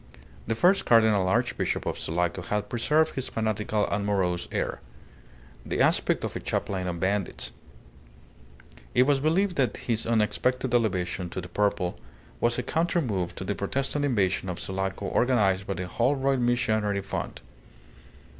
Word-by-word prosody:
The 115 - 0
first 180 - +4
Cardinal 110 -5 +5
Archbishop 95 - 0
of - - -2
Sulaco 85 +2 -1
had 105 +4 -2
preserved 150 +7 +2
his 130 - -3
fanatical 110 -1 0
and 100 0 -1
morose 90 -4 0
air; - - -2 0.8
the - - -3
aspect - - +2
of - - -3
a - - -2
chaplain 95 -2 -2
of 85 -1 -3
bandits. 100 +2 -1 1.4
It 125 - +6
was 140 +1 +3
believed 175 +6 +1
that 125 -6 +1
his 115 -2 -2
unexpected 120 +3 +1
elevation 90 -6 0
to 95 - -5
the 90 -1 -7
purple 90 -5 0 0.4
was 120 0 +1
a 125 - -1
counter 170 +6 +1
move 100 - -2
to - - -5
the 100 +2 -1
Protestant 135 +8 -2
invasion 100 -8 +1
of 90 - -4
Sulaco 95 +1 -3
organized 100 -6 +2
by 100 - -2
the 90 - -4
Holroyd 135 +6 +1
Missionary 110 -4 +1
Fund. - - -5
105 Hz, 150 wpm, -27 LUFS, 95-125 Hz, 1.4 s, It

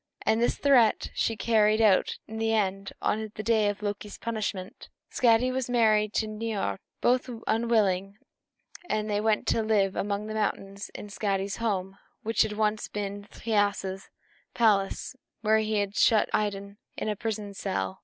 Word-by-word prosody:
And 220 +1 +2
this 240 - +1
threat 250 -6 +3
she 225 - 0
carried 215 0 +3
out 215 -4 +3
in 220 - -7
the 225 0 +1
end, 195 -2 -1
on 220 0 -1
the 215 - -5
day 220 -2 +3
of 205 0 -5
Loki's 205 0 -4
punishment. 215 -4 -4 0.2
Skadi 245 +1 +3
was 255 -1 -2
married 215 -3 +3
to 220 - +2
old 215 0 -7
Niörd, 220 -4 -2 0.2
both 250 +1 +2 0.2
unwilling; 205 -4 +1 0.7
and 215 0 0
they 205 -1 0
went 215 -1 +1
to 225 - +2
live 205 -3 +2
among 205 +1 -2
the 215 - -5
mountains 200 -2 -3
in 210 - -8
Skadi's 195 -1 -2
home, 195 -4 -2 0.2
which 225 +1 +1
had 215 -1 +2
once 215 0 0
been 200 0 -5
Thiasse's 205 -3 -1 0.5
palace, 210 -1 +1 0.3
where 220 0 +3
he 215 0 0
had 205 0 -1
shut 220 -2 +4
Idun 200 0 -2 0.2
in - - -3
a 210 - 0
prison 210 -2 -4
cell. 95 - -3
210 Hz, 165 wpm, -27 LUFS, 200-220 Hz, 0.7 s, shut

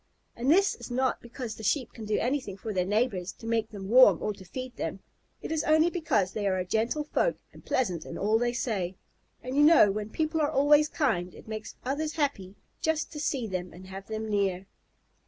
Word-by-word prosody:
And 245 +3 -1
this 390 +6 +5
is - - -9
not 255 +1 0
because 235 -1 -6
the 220 - -11
Sheep 230 +4 0
can 225 - -8
do 210 0 0
anything 245 -6 -1
for 215 +1 -5
their 180 -1 0
neighbors 205 -3 0
to 225 - -13
make 225 -1 0
them 200 -3 -8
warm 225 -6 +7
or 210 - -2
to 195 -1 -13
feed 255 +7 -7
them. - - -4 0.4
It - - -5
is 320 -2 0
only 315 +2 +4
because 300 - +1
they 205 0 -2
are 190 -1 +1
a 180 - -2
gentle 225 +10 0
folk - - 0 0.2
and - - -15
pleasant 185 -11 -1
in - - -7
all 215 +3 +2
they 240 0 +1
say; 195 -7 -2 0.5
and 255 +1 -4
you 290 - +4
know 295 -9 +7
when 210 +1 -4
people 315 +5 -1
are 290 - +2
always 295 +2 +4
kind, 185 - 0
it - - -14
makes 220 0 -6
others 300 +4 -1
happy 240 - -2 0.3
just 320 -1 0
to 300 - -7
see 275 -4 -1
them 185 -3 -4
and 185 +2 -12
have 195 +1 -8
them 220 0 -4
near. 195 -3 0
225 Hz, 220 wpm, -28 LUFS, 200-285 Hz, 0.5 s, warm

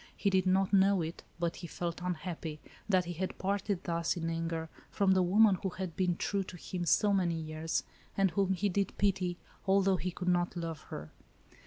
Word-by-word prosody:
He 200 - +1
did 190 -1 +3
not 190 +1 +2
know 195 -2 +5
it, 160 +2 -5 0.2
but 170 -1 -1
he 175 - -7
felt 170 0 -4
unhappy, 170 -3 -4 0.3
that 185 -3 +3
he 175 - -4
had 185 +3 -3
parted 200 -1 -1
thus, 170 +1 0
in 165 -1 -2
anger, 165 0 -2 0.2
from 195 -1 +2
the 190 -1 +5
woman, 195 +1 +5
who 190 - -1
had 185 -3 -5
been 180 -2 +1
true 200 -1 0
to 185 -1 -9
him, 175 +1 -4
so 205 +6 +4
many 180 -4 +2
years, 155 0 -2 0.3
and 195 -2 +3
whom 190 +1 +2
he 195 +3 0
did 200 0 -1
pity, 185 -3 +1 0.3
although 195 0 +4
he 180 - -2
could 180 +1 -6
not 175 0 +2
love 165 -3 -4
her. 75 +1 -7
180 Hz, 200 wpm, -32 LUFS, 170-195 Hz, 0.3 s, know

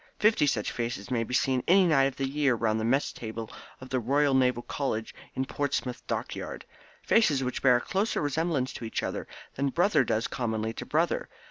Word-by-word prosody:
Fifty 210 -8 +3
such 115 -7 0
faces 115 -2 -4
may 115 -2 +1
be 125 +3 -3
seen 130 -1 +2
any 185 +2 +6
night 145 -6 +4
of 135 - -1
the 135 - -1
year 140 -2 +2
round 110 -1 0
the - - -2
mess 130 +5 +1
table 110 -1 -6 0.3
of 130 - -10
the 130 - 0
Royal 140 +4 +2
Naval 125 -2 +2
College 115 -6 -3 0.2
in 130 0 -1
Portsmouth 135 -3 -2
Dockyard - - -4 0.4
faces 155 - +3
which 125 -1 -3
bear 125 -2 +6
a 120 - +1
closer 200 +4 -1
resemblance 145 -3 0
to - - -8
each 110 - -3
other - - -4 0.3
than 140 +1 0
brother 180 +9 +3
does 110 0 0
commonly 110 -2 -2
to - - -7
brother. - - 0
130 Hz, 200 wpm, -28 LUFS, 115-145 Hz, 0.4 s, any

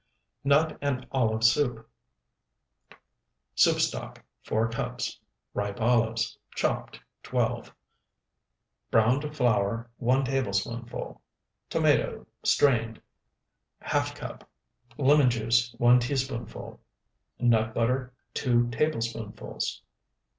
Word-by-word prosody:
NUT 150 +3 +3
AND 130 -3 -1
OLIVE 115 -4 +1
SOUP 115 -1 +2 1.7
Soup - - +4
stock, - - -2 0.2
4 110 +1 0
cups. 115 - -4 0.3
Ripe 100 0 -3
olives, 115 -1 +1 0.2
chopped, - - -2 0.2
12. - - -1 1.2
Browned 135 +7 +2
flour, 115 0 +1
1 130 +3 +2
tablespoonful. 120 -2 -3 0.5
Tomato, - - +1 0.2
strained, 115 -5 +2 0.8
½ - - 0
cup. - - -9 0.5
Lemon 145 -1 +5
juice, 120 +1 +1
1 120 +1 +5
teaspoonful. 130 -2 -4 0.6
Nut 110 -2 +3
butter, 125 +2 0 0.2
2 120 -2 +2
tablespoonfuls. 115 -5 -3
120 Hz, 80 wpm, -28 LUFS, 115-130 Hz, 1.7 s, Lemon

